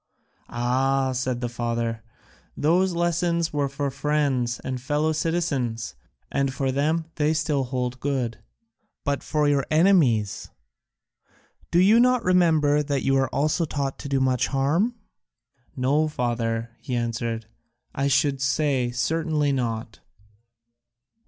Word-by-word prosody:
"Ah," 130 +3 +1
said 130 -1 -2
the 120 - -1
father, 115 -1 -2 0.6
"those 180 +4 +2
lessons 170 -1 0
were 145 -2 0
for 140 0 -3
friends 140 -4 0
and 130 -1 -4
fellow 150 +4 0
citizens, 145 - -1 0.4
and 140 -1 0
for 135 0 -1
them 155 +5 0
they 155 0 +2
still 150 -3 0
hold 125 0 -3
good, 125 -5 -2 0.6
but 140 -1 -1
for 150 -1 0
your 140 -1 +2
enemies 155 - +3 1.2
do - - +1
you 200 +6 +6
not 250 0 +3
remember 160 -5 +3
that 140 -2 -1
you 135 - +2
were 135 -1 +2
also 150 +4 0
taught 140 -3 -3
to 140 - -6
do 135 -1 +1
much 130 -2 +1
harm?" 155 - +1 0.8
"No, 140 +4 +2
father," 115 -4 -2
he 130 -3 -4
answered, 115 -1 -2 0.5
"I 135 +1 0
should 140 0 +2
say 140 -3 +1
certainly 150 +4 0
not." 115 -4 -3
140 Hz, 125 wpm, -24 LUFS, 125-155 Hz, 1.2 s, you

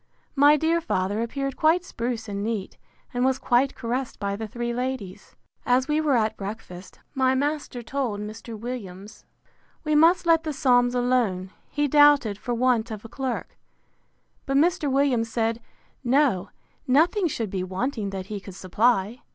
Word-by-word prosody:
My 290 +2 +6
dear 330 +3 +1
father 200 - -1
appeared 275 +3 -3
quite 335 +3 +2
spruce 235 -6 -4
and 200 -1 -4
neat, 215 -3 -3 0.4
and 245 0 0
was 265 0 +2
quite 255 +3 +1
caressed 245 +2 -3
by 200 -1 -2
the 220 +1 -5
three 240 +2 -3
ladies. 250 -6 -5 0.3
As 255 +1 +2
we 305 +1 +1
were 295 -4 +2
at 220 -1 0
breakfast, 195 -3 -8
my 260 -1 +2
master 285 -3 -2
told 245 -5 -2
Mr. 220 +2 -7
Williams, 210 -4 -8 0.6
We 305 -1 0
must 335 +4 +5
let 330 -1 +4
the 310 -2 -3
Psalms 245 -3 +3
alone, 240 -7 0 0.2
he 290 0 0
doubted, 285 -7 +5
for 240 +2 -3
want 240 -1 +1
of 215 -1 -7
a - - -9
clerk: 255 0 -4 0.9
but 275 0 +1
Mr. 305 -2 +2
Williams 260 -4 +2
said, 225 0 -1 0.4
No, 245 -7 +2 0.4
nothing 335 - +3
should 225 - -3
be 185 -2 -2
wanting 205 +3 -3
that 190 -1 -5
he 205 +1 -5
could 195 -1 -11
supply. 210 +4 +1
245 Hz, 160 wpm, -25 LUFS, 215-275 Hz, 0.9 s, My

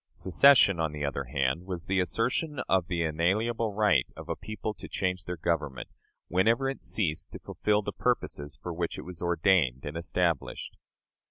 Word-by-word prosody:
Secession, 100 -2 +5
on 80 -2 0
the 75 -1 -3
other 70 -1 -3
hand, 70 +7 -1
was 90 -2 -4
the 95 0 +1
assertion 125 - 0
of 95 -3 +2
the 85 -2 -1
inalienable 105 +9 0
right 100 -10 +3
of - - -9
a - - -1
people 110 0 -5
to 95 - -10
change 90 -4 -2
their 90 0 -4
government, 75 -5 -2 0.4
whenever 115 +9 +2
it 135 - -4
ceased 80 -8 -1
to - - -5
fulfill 105 0 0
the - - -4
purposes 70 0 -2
for 90 - -5
which 85 0 -3
it - - -6
was 90 -2 -7
ordained 85 -7 +2
and 75 +2 -5
established. 85 -2 -1
90 Hz, 175 wpm, -29 LUFS, 80-105 Hz, 0.4 s, Secession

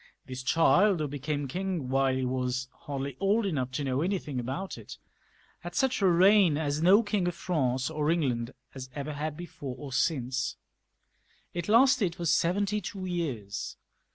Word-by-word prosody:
This 130 0 -6
child, 175 +7 +4
who 150 - -1
became 145 +1 -3
king 180 -1 -3
wjiile 135 0 +2
he 130 - -1
was 125 0 -2
hardly 140 -1 -5
old 205 +3 +2
enough 140 -9 -1
to 145 - -2
know 135 0 0
anything 170 -7 -2
about, 135 +11 -4
it, - - -10 0.6
had - - -8
such 265 -5 +1
a 195 - +5
reign 185 -2 +5
as 150 -1 -1
no 195 +6 +6
King 205 -4 0
of 175 - -2
France 130 -8 0
or 155 -1 -1
England 130 -8 0 0.2
has 130 -1 -8
ever 145 +1 -4
had 150 +1 -4
before 145 -7 -7
or 140 -3 -8
since. 130 -1 0 1.0
It 175 +2 -4
lasted 225 -6 +4
for 175 - -5
seventy 200 +6 +1
two 185 0 -6
years. 135 - -4
150 Hz, 165 wpm, -29 LUFS, 130-185 Hz, 1.0 s, no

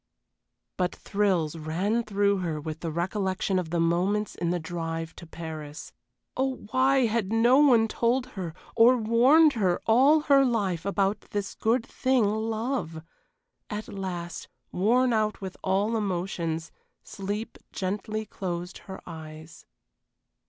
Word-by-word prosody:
But 180 -1 0
thrills 185 -6 0
ran 175 +9 -1
through 200 -2 +1
her 165 -4 -2
with 155 +1 -6
the 165 - -4
recollection 185 +3 -1
of 175 -3 -4
the 170 +1 -1
moments 185 +6 +1
in 170 - -2
the 175 - +1
drive 165 -1 -4
to 170 - -10
Paris 160 -2 -8 0.4
oh, 265 -2 -2
why 265 0 +4
had 220 -3 -1
no 235 +4 +5
one 245 -7 +5
told 240 +3 +1
her 175 -5 -5 0.2
or 240 +2 +6
warned 255 +8 +5
her 190 -7 +1
all 270 +7 +5
her 280 -2 +5
life 200 -9 0
about 200 0 +1
this 205 -1 -3
good 230 +2 +1
thing 260 -4 +1
love? 220 - -2 0.7
At 210 0 -5
last, 180 -3 -5 0.2
worn 240 +6 +2
out 215 -1 0
with 190 -2 -6
all 200 +4 +1
emotions, 175 -5 -2 0.3
sleep 205 +3 -5
gently 210 +3 -3
closed 180 -3 -5
her 190 - -7
eyes. 160 -1 -10
200 Hz, 135 wpm, -27 LUFS, 170-225 Hz, 0.7 s, or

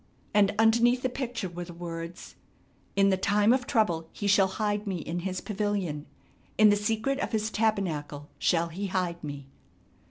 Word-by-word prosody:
And 205 -1 +4
underneath 235 +3 +4
the 255 - +1
picture 245 -5 -4
were 175 0 -6
the 175 -1 -11
words: 170 0 -7 0.6
"'In 195 0 +4
the 190 - +2
time 205 +4 +3
of 255 -1 -1
trouble 170 -9 +1
He 205 - -6
shall 200 -1 +5
hide 205 +1 -2
me 195 - -1
in 170 +1 -4
His 185 +1 -3
pavilion; 195 -8 -2 0.5
in 215 0 +7
the - - +4
secret 225 +6 -1
of - - -3
his 220 0 0
tabernacle 160 -10 -1
shall 170 -1 +2
he 195 +5 -4
hide 180 -3 -2
me.' 145 -2 -6
200 Hz, 170 wpm, -28 LUFS, 170-215 Hz, 0.6 s, in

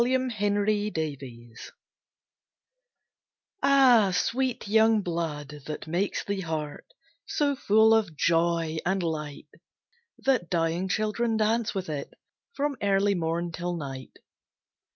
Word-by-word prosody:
AN 255 +1 0
EARLY 205 +1 +1
LOVE 130 -7 -6 1.9
Ah, 260 -7 +5
sweet 250 +6 -1
young 220 +1 +4
blood, 150 -4 -4
that 150 - -5
makes 175 +5 -1
the 200 -1 -3
heart 155 -4 -5 0.4
So 285 -1 0
full 220 -2 +4
of 205 -9 +1
joy, 165 -1 +1
and 190 +1 0
light, 150 -3 -4 0.7
That 255 -10 0
dying 170 +2 0
children 220 +3 0
dance 220 +1 0
with 190 -1 -3
it 145 -3 -5 0.4
From 285 -1 -1
early 200 0 +2
morn 170 -1 -2
till 175 +1 -4
night. 135 -4 -8
185 Hz, 110 wpm, -27 LUFS, 160-220 Hz, 1.9 s, Ah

